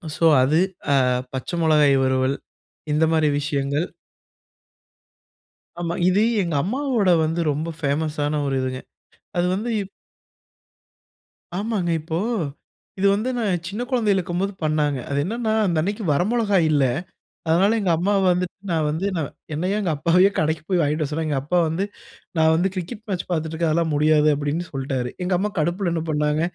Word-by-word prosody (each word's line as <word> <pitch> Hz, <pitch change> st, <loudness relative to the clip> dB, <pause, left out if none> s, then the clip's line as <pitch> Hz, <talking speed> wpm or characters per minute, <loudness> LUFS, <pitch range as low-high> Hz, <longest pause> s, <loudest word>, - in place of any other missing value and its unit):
So 165 Hz, -, +1 dB, 0.2 s
அது. 150 Hz, +6 st, +3 dB, 0.3 s
அ, -, -, +4 dB, 0.4 s
பச்சை 130 Hz, +7 st, -4 dB
மிளகாய் 150 Hz, -3 st, +4 dB
வறுவல், 130 Hz, +1 st, +1 dB, 0.6 s
இந்த 155 Hz, +2 st, +3 dB
மாதிரி 155 Hz, -2 st, +3 dB
விஷயங்கள். 145 Hz, +2 st, -1 dB, 1.9 s
ஆமா. 170 Hz, 0 st, -2 dB, 0.2 s
இது 195 Hz, +3 st, +3 dB, 0.2 s
எங்க 170 Hz, -4 st, -2 dB
அம்மாவோட 240 Hz, -2 st, 0 dB
வந்து 165 Hz, +2 st, -1 dB
ரொம்ப 155 Hz, +3 st, -3 dB
ஃபேமஸான 150 Hz, 0 st, -1 dB
ஒரு 135 Hz, -1 st, -1 dB
இதுங்க. 130 Hz, 0 st, -3 dB, 0.6 s
அது 175 Hz, -, +2 dB
வந்து 225 Hz, +5 st, -3 dB
இப் 195 Hz, -, -8 dB, 1.7 s
ஆமாங்க. 200 Hz, -3 st, -1 dB
இப்போ 160 Hz, +1 st, -3 dB, 0.8 s
இது 200 Hz, -, +4 dB
வந்து 225 Hz, +5 st, -1 dB
நான் 190 Hz, -7 st, -1 dB
சின்ன 205 Hz, +5 st, -4 dB
கொழந்தையில 220 Hz, -6 st, +2 dB
இருக்கும்போது 185 Hz, +3 st, -2 dB
பண்ணாங்க. 150 Hz, -3 st, +1 dB
அது 140 Hz, -, -1 dB
என்னன்னா 225 Hz, +3 st, -2 dB
அந்த 170 Hz, -4 st, 0 dB
அன்னிக்கி 205 Hz, +5 st, -2 dB
வரமொளகா 205 Hz, +5 st, +1 dB
இல்ல. 145 Hz, -3 st, +3 dB, 0.6 s
அதனால 190 Hz, +7 st, +3 dB
எங்க 190 Hz, -4 st, +1 dB
அம்மா 190 Hz, +5 st, +1 dB
வந்துட்டு 180 Hz, 0 st, +1 dB, 0.2 s
நான் 160 Hz, -2 st, +1 dB
வந்து 160 Hz, +6 st, -2 dB
நான் 155 Hz, -4 st, -2 dB, 0.2 s
என்னைய 185 Hz, +7 st, -1 dB
எங்க 190 Hz, -5 st, -1 dB
அப்பாவயோ 175 Hz, +6 st, +4 dB
கடைக்கு 155 Hz, 0 st, 0 dB
போய் 185 Hz, -2 st, +2 dB
வாங்கிட்டு 150 Hz, +1 st, 0 dB
வர 145 Hz, -, -3 dB
சொன்னாங்க. 155 Hz, 0 st, -2 dB
எங்க 140 Hz, -2 st, 0 dB
அப்பா 175 Hz, +5 st, 0 dB
வந்து 165 Hz, +5 st, -1 dB, 0.5 s
நான் 160 Hz, 0 st, +4 dB
வந்து 180 Hz, +4 st, +2 dB
கிரிக்கெட் 205 Hz, +5 st, -5 dB
மேட்ச் 185 Hz, -3 st, -2 dB
பார்த்துட்டு 160 Hz, -2 st, -2 dB
இருக்கேன். 165 Hz, 0 st, 0 dB
அதெல்லாம் 165 Hz, 0 st, +1 dB
முடியாது 150 Hz, 0 st, +4 dB
அப்டின்னு 150 Hz, +4 st, -2 dB
சொல்லிட்டாரு. 135 Hz, -2 st, -2 dB
எங்க 180 Hz, +1 st, 0 dB
அம்மா 210 Hz, +3 st, 0 dB
கடுப்புல 175 Hz, +3 st, 0 dB
என்ன 165 Hz, -, -1 dB
பண்ணாங்க, 150 Hz, 0 st, +1 dB
165 Hz, 155 wpm, -22 LUFS, 150-190 Hz, 1.9 s, அ